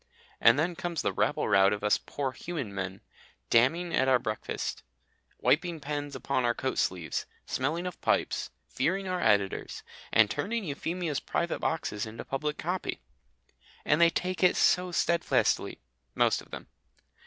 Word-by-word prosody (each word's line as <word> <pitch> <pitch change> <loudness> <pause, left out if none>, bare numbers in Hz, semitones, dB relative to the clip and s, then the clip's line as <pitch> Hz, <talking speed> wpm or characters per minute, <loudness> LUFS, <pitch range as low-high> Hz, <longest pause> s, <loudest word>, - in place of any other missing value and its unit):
And 115 +3 +6
then 170 +4 0
comes 170 -1 -3
the - - 0
rabble - - +1
rout 95 0 +5
of 105 0 -3
us 105 - +3
poor 140 -2 -3
human 135 - -5
men, 95 0 -4 0.5
damning 165 +9 +3
at 130 - +3
our 130 -1 +5
breakfasts, 110 -3 -4 0.6
wiping 165 +2 +1
pens 145 0 -4
upon 135 -2 -1
our 120 -1 +2
coat 130 - -2
sleeves, 85 -5 -1 0.2
smelling 160 +7 -1
of 180 - -6
pipes, - - 0 0.2
fearing 190 +8 -1
our 180 -1 -1
editors, 100 -3 +1 0.3
and 110 - +6
turning 210 - -2
Euphemia's 165 0 -2
private 170 - -2
boxes 110 -9 -2
into 110 +1 -8
public 150 +2 -2
copy. 180 +3 -3 0.9
And 150 +3 +3
they 170 - +7
take 180 +2 -2
it 180 - +5
so 180 0 +3
steadfastly 170 0 +1 0.4
most - - +3
of - - -17
them. - - -8
145 Hz, 155 wpm, -29 LUFS, 115-175 Hz, 0.9 s, they